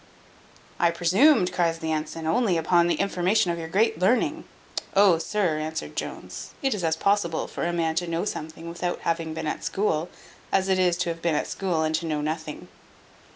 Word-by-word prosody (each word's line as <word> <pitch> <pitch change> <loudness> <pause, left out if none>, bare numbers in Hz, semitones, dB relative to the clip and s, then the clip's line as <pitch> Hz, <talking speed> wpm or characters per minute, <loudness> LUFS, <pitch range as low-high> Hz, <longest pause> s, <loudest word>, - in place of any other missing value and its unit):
"I 170 - +4
presumed," 180 - +4
cries 170 -2 +1
the 160 -1 -3
ensign, 155 +1 -3
"only 180 +2 +2
upon 170 +1 +3
the 175 - +2
information 190 -1 +1
of 170 - -3
your 165 - -5
great 195 0 +1
learning." 280 - +1 0.5
"Oh! 195 -4 +6
sir," 175 -4 0
answered 155 +1 -4
Jones, - - -6
"it 270 - +2
is 200 -4 -4
as 160 -1 +2
possible 195 -2 +1
for - - -3
a - - 0
man 165 -2 0
to 175 0 0
know 165 +3 -1
something 160 -3 -5
without 175 +1 -3
having 165 -1 -2
been - - -4
at 155 - -3
school, 175 -5 0 0.4
as 195 0 +2
it 190 -1 +3
is 180 -2 +3
to 175 -1 -1
have 165 0 -4
been 170 -2 +1
at - - 0
school 175 -5 -1
and 155 0 0
to 165 +1 -1
know 155 -2 -1
nothing." 155 0 -4
170 Hz, 200 wpm, -25 LUFS, 160-190 Hz, 0.5 s, Oh